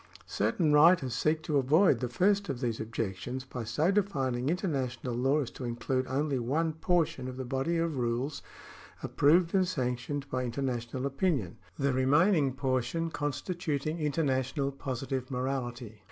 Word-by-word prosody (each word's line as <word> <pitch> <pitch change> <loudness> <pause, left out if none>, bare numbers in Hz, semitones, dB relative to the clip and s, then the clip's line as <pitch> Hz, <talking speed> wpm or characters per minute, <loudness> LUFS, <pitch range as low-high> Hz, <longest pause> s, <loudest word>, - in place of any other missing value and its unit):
Certain 150 - +1
writers 150 -4 +5
seek 155 +5 +1
to 150 - 0
avoid 145 - +4
the 125 0 -2
first 200 - +2
of 135 -3 -3
these 120 -3 -2
objections 115 +3 -4
by 125 -2 -6
so 145 - +1
defining 135 -11 0
international 135 - -2
law 135 +5 +2
as 130 - -5
to - - -9
include 125 +2 -2
only 140 0 0
one 155 +7 0
portion 160 -5 0
of 130 0 -6
the 130 - -4
body 135 +6 -1
of 165 -3 -1
rules 125 +4 -1 0.6
approved 165 +4 +3
and 190 -2 +3
sanctioned 135 -2 -2
by 130 0 -1
international 125 0 -3
opinion, 140 - -1 0.2
the 140 -1 +1
remaining 145 +3 +3
portion 135 +5 -1
constituting 155 +1 -2
international 140 -2 0
positive 130 -1 -4
morality. 125 -4 -3
135 Hz, 145 wpm, -30 LUFS, 125-155 Hz, 0.6 s, writers